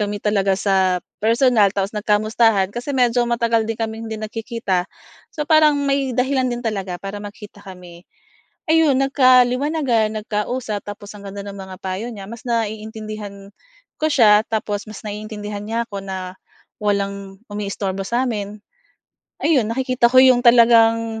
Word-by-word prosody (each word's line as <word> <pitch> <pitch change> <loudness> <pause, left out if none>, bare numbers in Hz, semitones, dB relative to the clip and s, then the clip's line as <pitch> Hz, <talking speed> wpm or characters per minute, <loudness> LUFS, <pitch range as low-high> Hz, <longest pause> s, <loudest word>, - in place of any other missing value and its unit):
kami 205 0 -2
talaga 200 -2 +1
sa 190 -2 +1 0.2
personal 225 -3 +3
tapos 195 +2 -1
nagkamustahan 210 -1 +1
kasi 265 +3 -4
medyo 245 -1 +2
matagal 230 -1 +1
din 225 - -2
kaming 225 0 -4
hindi 220 - -4
nagkikita, 215 -4 -3 0.4
so 300 -1 -5
parang 310 -2 +5
may 275 -1 0
dahilan 260 0 +1
din 240 0 -5
talaga 195 -5 -3
para 195 +2 -7
magkita 205 0 -11
kami. 180 -3 -12 0.6
Ayun, 315 -4 +3
nagkaliwanagan, 255 -3 +3
nagkausap 210 0 -3
tapos 205 0 -9
ang 200 - -13
ganda 200 +1 -7
ng 200 0 -8
mga 190 -1 -9
payo 190 +5 -4
niya 200 -3 -9
mas 230 +1 -10
naiintindihan 215 -3 -4 0.5
ko 310 - +2
siya 215 -7 +5
tapos 210 -2 -2
mas 215 - -9
naiintindihan 210 0 -6
niya 230 +2 -2
ako 200 -1 -6
na 190 -1 -6 0.5
walang 200 -1 -2 0.2
umiistorbo 195 -1 -3
sa'min. 215 -3 -2 0.8
Ayun, 265 -9 +2
nakikita 255 -1 +1
ko 255 - +5
'yong 255 -2 +6
talagang 230 -2 +4
215 Hz, 140 wpm, -20 LUFS, 200-240 Hz, 0.8 s, yong